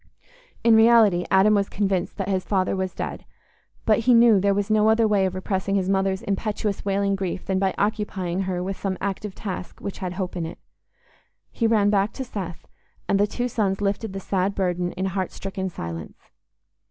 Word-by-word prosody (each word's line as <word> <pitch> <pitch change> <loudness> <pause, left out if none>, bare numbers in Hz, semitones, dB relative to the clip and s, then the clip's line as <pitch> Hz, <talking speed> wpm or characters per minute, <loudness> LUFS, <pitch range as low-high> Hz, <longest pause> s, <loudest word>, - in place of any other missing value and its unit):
In 230 -1 +6
reality 220 -5 +5
Adam 195 +3 +5
was 200 -1 +1
convinced 195 -3 -1
that 195 -2 -3
his 190 -2 0
father 190 -2 0
was 190 -1 -3
dead - - -5 0.6
but 215 -1 +4
he 245 +2 +4
knew 230 -3 +6
there 200 +1 +2
was 205 +1 -1
no 215 0 +4
other 220 0 +4
way 200 -3 +2
of 185 - -5
repressing 190 +1 -1
his 190 -2 +1
mother's 195 0 +1
impetuous 205 0 -2
wailing 200 0 +1
grief 190 -1 -4
than 190 -1 0
by 190 -1 0
occupying 200 -4 -1
her 180 -1 -2
with 190 +1 -4
some 190 -2 -2
active 200 0 -4
task 185 -3 -6
which 200 - -6
had 180 -2 -4
hope 185 -1 -4
in 170 -2 -2
it. - - -9 0.9
He 230 - 0
ran 210 -2 +3
back 200 +1 +1
to 265 - -4
Seth, 190 -9 -6 0.4
and 195 - +2
the 205 - +3
two 245 +4 -2
sons 200 -5 0
lifted 205 +1 -2
the 195 - -4
sad 195 +1 -1
burden 180 -2 -1
in 190 - -3
heart 190 -1 -2
stricken 190 -1 -4
silence. 85 - -7
195 Hz, 195 wpm, -24 LUFS, 185-210 Hz, 0.9 s, In